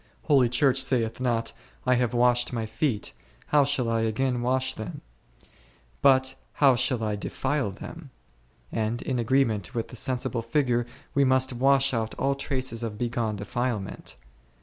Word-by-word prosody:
Holy 135 -5 +4
Church 130 +2 +3
saith 120 -4 0
not, 120 -3 -1 0.3
I 125 - +4
have 125 -2 +1
washed 120 0 +3
my 115 -3 -2
feet, 110 -1 -2 0.4
how 145 -1 +5
shall 135 -3 0
I 115 0 +1
again 120 +3 0
wash 130 +1 +1
them? 110 -4 -7 1.0
but 130 -1 +4 0.2
how 135 -3 +5
shall 120 -1 0
I 105 -1 -1
defile 130 +4 -2
them? 95 - -9 0.6
and 110 +1 -2
in 130 -2 -1
agreement 115 -6 +1
with 115 - -2
the - - -10
sensible 125 -1 -1
figure 120 0 0 0.3
we 140 - +3
must 130 -1 +3
wash 135 +2 +3
out 110 -2 -2
all 140 +1 +1
traces 130 -4 -2
of 110 -3 -4
bygone 115 -2 -1
defilement. 105 - -4
125 Hz, 150 wpm, -26 LUFS, 115-130 Hz, 1.0 s, how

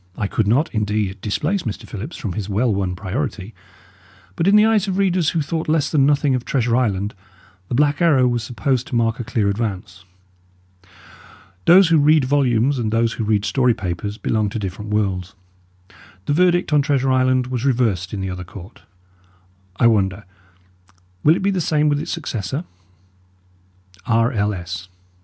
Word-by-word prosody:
I 105 - -1
could 100 +1 -1
not, 135 +10 +1
indeed, 105 -3 -2
displace 150 - -1
Mr. 110 -8 -6
Phillips 110 - -7
from 100 -6 -4
his 105 0 -5
well 110 +3 +1
won 95 -2 -2
priority; 105 +2 -4 0.8
but 165 - 0
in 200 - +5
the 210 +1 +6
eyes 215 -3 +2
of 190 -1 -2
readers 185 -4 +2
who 165 -3 -1
thought 160 +1 -3
less 155 -2 +1
than 140 -3 +3
nothing 145 -1 +2
of 125 -2 -1
Treasure 125 -3 0
Island, 105 -5 0 0.5
The 120 - -3
Black 145 +4 +2
Arrow 145 -7 +4
was 120 -1 0
supposed 125 +2 -2
to - - -5
mark 115 0 +1
a - - -3
clear 110 -2 -1
advance. 100 -3 -4 1.6
Those 180 0 +7
who 165 -2 +4
read 150 -1 +4
volumes 130 -1 +1
and 110 -3 -1
those 115 0 +1
who - - -4
read 105 -1 +1
story 125 +2 +2
papers 100 0 -4
belong 110 0 -1
to 105 - -5
different 105 +1 -5
worlds. 95 -4 -2 0.9
The 145 - 0
verdict 175 0 +2
on 145 - +5
Treasure 135 -2 +1
Island 130 0 +2
was 125 -1 -4
reversed 115 -10 0
in 100 - -4
the 95 - -3
other 90 0 -6
court; 90 +3 -12 0.9
I 120 - +1
wonder, 100 -3 +2 1.0
will 155 +2 +5
it - - -4
be 200 - +2
the 190 -2 -1
same 150 -1 +1
with 145 0 +1
its - - -6
successor? 135 - -4 1.4
_R. 115 +2 +2
L. 105 0 +1
S. 90 +1 -7
120 Hz, 175 wpm, -20 LUFS, 105-145 Hz, 1.6 s, Those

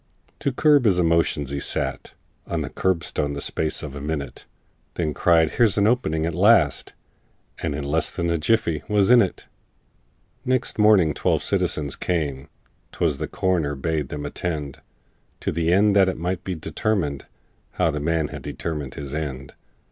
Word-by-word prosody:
To 140 - 0
curb 145 0 +4
his 95 -5 +4
emotions, 85 -5 +1
he 70 - -2
sat - - -3 0.3
On - - -2
the - - -5
curbstone 85 -5 -1
the 70 - -4
space 80 +2 -2
of 70 -3 -6
a 70 - -7
minute, 70 -3 -5 0.5
Then 80 -3 -1
cried, 80 -2 +3
"Here's 115 -5 +3
an 100 - +3
opening 90 -10 +1
at 85 - -2
last!" 90 - +3 0.7
And 80 -4 -2
in 75 - -4
less 75 +3 0
than 85 -1 -2
a 85 - 0
jiffy 85 -3 +1
was 105 0 +3
in 125 -1 +8
it! 95 - -2 1.0
Next 130 -3 -1
morning 105 -7 +5
twelve - - 0
citizens 70 -3 0
came 75 -5 -2 0.4
('Twas 75 -5 -1
the - - -3
coroner 85 -6 0
bade 75 0 -2
them 75 0 -5
attend), 75 -2 -4 0.6
To - - -1
the 85 +1 0
end 100 +2 +4
that 95 -2 +5
it - - -4
might 90 +2 -3
be 95 - -3
determined 80 -4 -2 0.5
How - - +1
the 75 - -3
man 80 0 0
had - - -8
determined 75 -5 -5
his 70 -1 -7
end! 70 -4 -5
80 Hz, 170 wpm, -23 LUFS, 75-95 Hz, 1.0 s, in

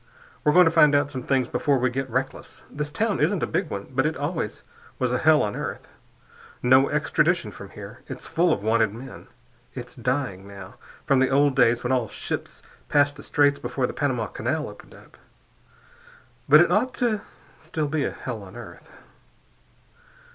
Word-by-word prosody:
We're 150 - +4
going 180 0 +7
to 165 - +3
find 150 -3 +5
out 145 0 +2
some 130 -3 -5
things 130 0 +1
before 140 -2 +1
we 130 0 +1
get 135 +1 -3
reckless. 130 +3 -4
This 150 +1 -3
town 215 +6 -1
isn't 200 -6 +1
a - - +3
big 180 -5 -2
one, 100 0 -5
but 130 +2 +1
it 155 - -3
always 145 - -3 0.3
was 125 -1 0
a 125 - 0
hell 155 -1 +5
on 105 - -2
earth. - - -5 0.8
No 130 +2 +5
extradition - - +1
from - - -11
here. - - -11
It's - - -8
full 170 +1 +2
of 100 - -1
wanted 110 -1 +2
men. 130 +3 -10 0.5
It's 125 -1 -8
dying, 125 -6 -2
now, 100 -1 -11 0.3
from 135 - +3
the 130 - +3
old 140 0 +3
days 120 -2 +3
when 125 - -1
all 125 -3 +1
ships - - -5 0.3
passed 145 0 +3
the 140 - -11
Straits 145 -1 +2
before 130 - -2
the - - -4
Panama 130 -6 -1
Canal - - -3
opened - - -13
up, - - -18 1.3
but 150 +3 +9
it 175 - +3
ought 235 +7 +1
to 235 -3 +1
be - - -13 0.4
still 155 -1 -3
a 145 - +1
hell 120 -4 -6
on 95 -2 -12
earth. - - -11
135 Hz, 185 wpm, -24 LUFS, 125-150 Hz, 1.3 s, but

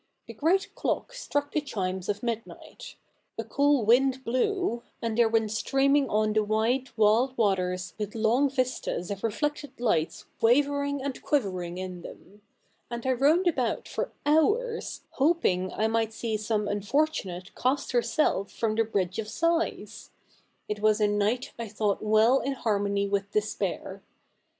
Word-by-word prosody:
The - - -9
great 360 +6 +1
clock - - -2
struck 290 -12 -2
the 305 - 0
chimes 190 -8 -3
of 205 +2 -2
midnight, 235 - -6 0.4
a 225 - -2
cool 280 +1 +2
wind 260 +3 +3
blew; 255 - 0 0.2
and 230 -1 -2
there 230 -1 +4
went 220 -2 +1
streaming 275 +4 +2
on 215 0 +1
the 215 0 +3
wide 225 +5 0
wild 225 +5 +3
waters 185 -4 0
with 210 0 -4
long 230 +6 +3
vistas 255 -8 -2
of 200 -1 -5
reflected 290 +6 -2
lights 170 -10 0 0.2
wavering 285 +3 +2
and 275 -2 -4
quivering 185 - -1
in 185 -1 -6
them; 205 +4 -13 0.5
and 235 0 -5
I 260 - +2
roamed 295 +8 +3
about 260 -9 0
for - - -3
hours, 420 +11 +1
hoping 260 - +1
I 215 - -1
might 225 0 0
see 225 0 -2
somt 210 -1 -1
unfortunate 205 - -1
cast 270 +3 0
herself 235 -4 +1
from 225 -2 -1
the 225 +1 +2
Bridge 190 -3 -1
of 215 - -3
Sighs. 335 +9 -1 0.6
It 210 0 -3
was 215 0 +3
a 210 - +3
night 205 +5 0
I 230 - -4
thought 210 -1 -1
well 220 +5 +4
in 275 - -2
harmony 200 -4 0
with 200 0 -1
despair. 215 0 -2
225 Hz, 150 wpm, -27 LUFS, 205-275 Hz, 0.6 s, there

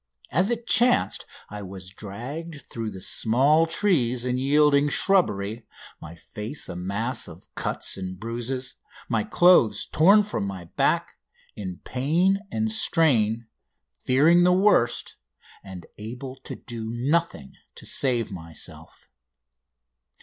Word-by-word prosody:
As 180 - +2
it 235 -1 -2
chanced, 240 +2 +3 0.2
I 105 0 -6
was 95 -1 -9
dragged 140 - -7
through 115 -2 -5
the 95 - -9
small 140 - +2
trees 130 - +1
and 125 0 -1
yielding 145 +1 +3
shrubbery, 110 - +1 0.3
my 85 - -10
face 105 - -6
a - - -7
mass 100 +7 -2
of - - -14
cuts - - -4
and 95 -1 -6
bruises, 120 +4 -5 0.3
my 115 -3 0
clothes 125 - +4
torn 200 +7 +6
from 200 - -3
my 95 -3 -7
back, - - 0 0.4
in 95 -3 -7
pain 170 +10 +1
and 220 0 -1
strain, 120 - +2 0.5
fearing 155 +7 +4
the 180 0 +5
worst, 185 - +2 0.5
and 95 -3 -10
able 125 +5 -7
to - - -6
do 115 -2 -7
nothing 125 - -1 0.2
to - - -11
save 120 -5 0
myself. 85 -4 -10
125 Hz, 125 wpm, -25 LUFS, 105-165 Hz, 0.5 s, torn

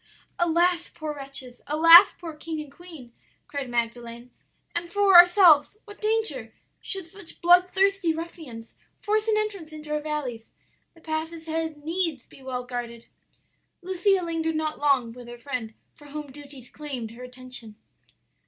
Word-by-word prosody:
"'Alas, 345 0 +2
poor 310 -2 -6
wretches! 270 -3 -5
alas 330 +5 +8
poor 335 -2 -8
king 315 +1 -6
and 300 -2 -8
queen!' 305 -7 -13 0.3
cried 280 -3 -5
Magdalen; 235 0 -4 0.4
'and, 340 0 -3
for 405 +1 +3
ourselves, 350 -2 +7
what 415 -1 -14
danger, 425 - -1 0.3
should 385 -3 0
such 345 0 -10
bloodthirsty 365 +1 +3
ruffians 320 -8 -8 0.3
force 430 +1 0
an 435 -1 +2
entrance 400 -7 -3
into 305 -1 -9
our 300 - 0
valleys! 285 -7 -5 0.4
The 330 - -19
passes 320 +1 -4
had 320 -1 -3
needs 325 -4 -2
be - - -18
well 255 -1 -4
guarded!' 240 -2 -6 0.8
"Lucia 375 +1 +1
lingered 325 -1 -2
not 310 0 -2
long 270 -6 +1
with 245 0 -12
her 240 0 -9
friend, 240 -4 -6 0.2
for 295 - -18
home 290 -1 -8
duties 280 -3 -12
claimed 265 -7 -6
her 235 +2 -12
attention. 250 -3 -11
310 Hz, 145 wpm, -25 LUFS, 255-345 Hz, 0.8 s, alas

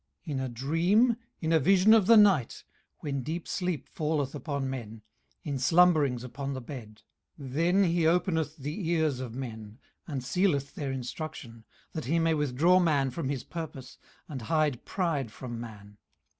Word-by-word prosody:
18:033:015 160 - -5
In 135 - -1
a 130 -1 -2
dream, 170 - +2 0.2
in 160 0 0
a 160 - +5
vision 195 +7 +5
of 215 -4 +5
the 230 - +8
night, 195 - +4 0.4
when 140 -2 -2
deep 160 +6 -5
sleep 180 -4 -2
falleth 150 -4 -2
upon 140 -1 -3
men, 115 -5 -6 0.4
in 140 -3 -3
slumberings 150 -4 +4
upon 135 +3 -5
the - - -4
bed; 120 -5 -10 0.4
18:033:016 135 -3 -8
Then 175 +6 +3
he 170 -2 +2
openeth 160 -3 +1
the 155 +5 -4
ears 160 -6 +1
of 120 -3 -6
men, 110 -4 -7 0.3
and 140 -6 -4
sealeth 140 -2 0
their 140 -3 -4
instruction, 130 0 -6
18:033:017 115 -1 -16 0.3
That 160 - -4
he 160 +7 +1
may 165 0 +2
withdraw 150 +5 +3
man 145 -7 +2
from 140 -1 -3
his 135 -4 -3
purpose, 145 -6 -8 0.3
and 135 -5 -6
hide 150 +1 0
pride 160 - -1
from 120 0 -7
man. 105 -3 -11
145 Hz, 170 wpm, -29 LUFS, 130-170 Hz, 0.4 s, the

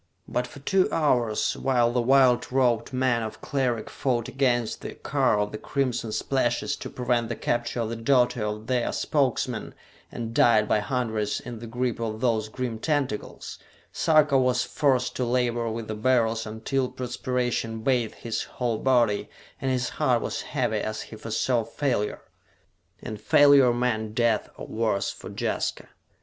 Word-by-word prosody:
But 125 +1 -1
for 125 - -13
two 190 +6 +2
hours, 120 -8 +1
while 120 -3 +2
the 120 0 +1
white 130 0 +4
robed 125 -3 +2
men 130 -2 +1
of 110 -1 -6
Cleric 125 -6 -1
fought 120 -3 -1
against 125 -3 0
the - - -7
car - - +1
of 105 0 -1
the 110 - -6
crimson 125 -5 -2
splashes 120 +1 0
to - - -7
prevent 120 -2 -1
the 115 - -2
capture 120 +1 -1
of 110 - -2
the 115 - -3
daughter 120 -1 +2
of 105 +1 -4
their 125 -1 0
Spokesman 140 -5 -1 0.4
and 115 -1 -5
died 110 -2 +4
by - - +3
hundreds 110 -2 -1
in 120 -2 -8
the 115 - -8
grip 120 +1 -2
of 110 -1 -3
those 110 -3 0
grim 120 -1 -4
tentacles 140 -6 -3 0.3
Sarka 150 -3 +4
was 125 -1 +2
forced 130 -4 +1
to 130 - 0
labor 120 -1 0
with 110 0 -5
the 110 - -3
Beryls 115 -1 +1
until 125 +4 -2
perspiration 125 -2 -2
bathed 125 -4 +1
his 115 -2 -3
whole 120 -3 -2
body 120 -6 +2 0.3
and 135 - 0
his 125 -1 0
heart - - +3
was - - -3
heavy - - -1
as 110 0 -3
he - - -11
foresaw 115 +2 0
failure. 115 -2 -2 0.8
And 110 -1 -6
failure 140 0 +6
meant 110 -3 -1
death 115 -3 +1
or - - -7
worse 110 -3 -1
for - - -10
Jaska. - - -3
120 Hz, 160 wpm, -26 LUFS, 110-130 Hz, 0.8 s, failure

